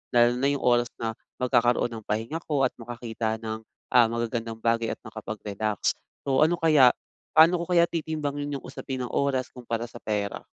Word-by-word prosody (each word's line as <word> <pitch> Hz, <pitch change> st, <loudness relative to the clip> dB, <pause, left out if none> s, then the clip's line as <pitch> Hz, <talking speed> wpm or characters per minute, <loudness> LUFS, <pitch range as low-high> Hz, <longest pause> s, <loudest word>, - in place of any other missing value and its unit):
Lalo 120 Hz, +1 st, +5 dB
na 135 Hz, -, +2 dB
yung 140 Hz, -1 st, 0 dB
oras 120 Hz, -1 st, +4 dB
na 115 Hz, -1 st, -2 dB, 0.3 s
magkakaroon 120 Hz, -1 st, +2 dB
ng 110 Hz, -2 st, -7 dB
pahinga 115 Hz, +10 st, -2 dB
ko 145 Hz, -3 st, +1 dB
at 130 Hz, -, +3 dB
makakita 115 Hz, -1 st, -3 dB
ng, 110 Hz, 0 st, -3 dB, 0.3 s
ah, 120 Hz, -2 st, +6 dB
magagandang 115 Hz, -1 st, -3 dB
bagay 115 Hz, 0 st, +1 dB
at -, -, -12 dB
makapag-relax. 110 Hz, -1 st, -3 dB, 0.3 s
So, 140 Hz, +2 st, +4 dB
ano 175 Hz, +2 st, +2 dB
kaya, 150 Hz, -7 st, +6 dB, 0.4 s
paano 165 Hz, +2 st, +7 dB
ko 170 Hz, -, -5 dB
kaya 170 Hz, -1 st, +6 dB
titimbang 155 Hz, -3 st, -3 dB
yun 145 Hz, -1 st, -3 dB
yung -, -, -14 dB
usapin 130 Hz, -1 st, -5 dB
ng 120 Hz, -, -5 dB
oras 135 Hz, -2 st, 0 dB
kumpara 115 Hz, -1 st, -4 dB
sa 120 Hz, -, -10 dB
pera? 105 Hz, -1 st, -3 dB
120 Hz, 180 wpm, -26 LUFS, 115-140 Hz, 0.4 s, paano